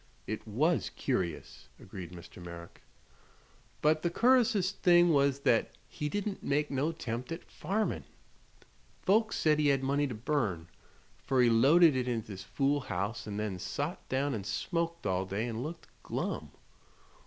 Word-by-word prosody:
"It 110 +1 -5
was 155 +11 +1
curious," 90 - -3
agreed 95 -3 -9
Mr. 90 0 -11
Merrick. 85 -1 -10 1.0
"But 155 +1 +4
the 170 - +1
cur'ous'est 230 -2 +3
thing 175 -3 +5
was 140 -1 +3
thet 115 -4 +2
he 150 - -4
didn't 205 +3 -3
make 145 +1 0
no 140 +4 0
'tempt 125 -5 -5
at 165 - -5
farmin'. 200 +7 -2 1.0
Folks 220 +3 +3
said 150 -1 +3
he 150 - +3
had 135 -1 +2
money 140 +2 +1
to 125 - -5
burn, 105 - -1 0.5
fer 135 -1 +1
he 120 - +5
loaded 150 +7 +6
it 125 -1 0
into 115 -3 -2
this 95 -2 -7
fool 140 +8 +1
house 100 -1 -3
an' 105 -1 -4
then 105 -3 -3
sot 145 - -4
down 135 +2 0
an' 105 - -3
smoked 170 - -2
all 95 0 +1
day 105 +5 -2
an' 115 -1 -4
looked 165 +5 -6 0.2
glum. - - -3
135 Hz, 155 wpm, -31 LUFS, 105-165 Hz, 1.0 s, loaded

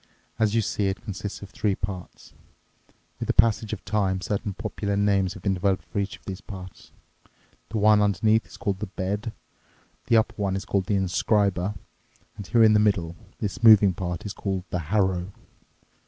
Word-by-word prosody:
As 110 -1 +2
you 115 - +3
see, 100 0 -1
it 95 +1 -3
consists 100 -1 -6
of 100 - -10
three 100 -3 0
parts. 95 -3 -7 0.9
With - - -4
the - - 0
passage 110 -1 +3
of 105 - -6
time 95 -3 0
certain 100 +1 -3
popular 105 -2 -3
names 100 -2 +2
have 90 - -11
been 100 - +1
developed 95 -2 0
for 85 - -4
each 100 0 -3
of - - -31
these 95 -1 -6
parts. 95 -2 -10 0.8
The 110 - -3
one 105 0 +5
underneath 110 +2 +2
is - - -13
called 95 -2 -2
the 105 - -4
bed, 100 +4 -3 0.8
the 115 - +5
upper 110 - +2
one 95 -1 0
is 95 - -4
called 100 -1 -1
the 105 - +1
inscriber, 100 +1 +1 0.6
and 100 -3 -8
here 115 -2 +4
in 110 -1 +6
the 105 - +5
middle, 95 -6 +1 0.2
this 110 +3 -4
moving 105 -4 +7
part 90 0 -4
is 105 - -4
called 95 -4 -3
the 90 - -1
harrow." 95 -3 +1
100 Hz, 185 wpm, -25 LUFS, 95-105 Hz, 0.9 s, moving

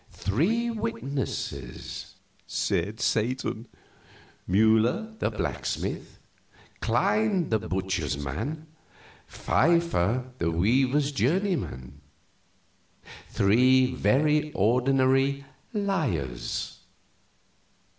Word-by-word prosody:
"Three 215 - 0
witnesses," 115 - -5 0.3
said 100 +6 -1
Satan: 120 0 -1 0.8
"Mueller, 110 - +3
the - - +1
blacksmith; - - -4 0.6
Klein, 210 -6 +1
the 110 - +2
butcher's 95 -8 -2
man; 105 - -4 0.6
Pfeiffer, 130 - +1
the 85 - +1
weaver's 130 - +2
journeyman. 140 - -1 1.3
Three 130 +5 +4
very 150 +4 +2
ordinary 135 +5 +2 0.3
liars. 150 - -2
130 Hz, 65 wpm, -27 LUFS, 100-150 Hz, 1.3 s, Three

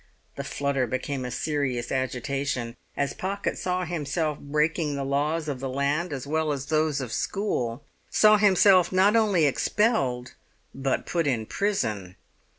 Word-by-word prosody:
The - - -4
flutter 140 -3 -1
became 130 +2 -3
a - - -3
serious 130 -2 -2
agitation 130 -1 -2 0.2
as 140 -1 0
Pocket 200 +2 -3
saw 180 0 -2
himself 155 -2 -2
breaking 150 +1 0
the 140 -1 -3
laws 150 +4 0
of 140 -3 -3
the 135 0 -4
land 140 +6 0
as 135 -2 -4
well 155 +1 0
as 135 -2 -3
those 155 -1 +1
of 120 -3 -5
school, 125 - -2 0.3
saw 215 0 +6
himself 195 -3 +5
not 190 +3 +4
only 205 -8 +3
expelled 135 - +1 0.4
but 135 0 -1
put 165 -3 0
in 120 -5 0
prison! 110 - -2
145 Hz, 150 wpm, -26 LUFS, 130-175 Hz, 0.4 s, saw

